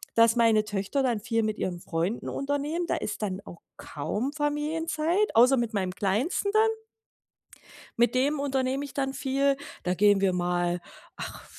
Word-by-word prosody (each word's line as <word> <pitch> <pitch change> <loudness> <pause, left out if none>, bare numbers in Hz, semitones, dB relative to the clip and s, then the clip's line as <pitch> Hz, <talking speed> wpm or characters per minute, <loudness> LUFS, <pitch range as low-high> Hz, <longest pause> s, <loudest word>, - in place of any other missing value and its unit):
dass 230 +1 +5
meine 225 -2 +4
Töchter 210 +7 -1
dann 240 -4 +1
viel 225 +1 0
mit 215 -1 -1
ihren 175 -2 -3
Freunden 170 +7 -2
unternehmen. 285 +5 -2
Da - - 0
ist - - -4
dann 195 -2 -3
auch 170 - -11 0.2
kaum 210 - -3
Familienzeit, 315 +5 0
außer 250 +4 +6
mit 235 -1 -1
meinem 190 -3 -1
Kleinsten 215 - 0
dann. 440 +1 +5 1.3
Mit 240 +2 +3
dem 280 +3 +2
unternehme 270 0 -1
ich 280 - -11
dann 270 -1 -1
viel. 275 0 +1 0.3
Da 180 - 0
gehen 205 +1 +4
wir 195 - +3
mal, 175 0 0 0.4
ach, - - -7
240 Hz, 160 wpm, -27 LUFS, 200-285 Hz, 1.3 s, außer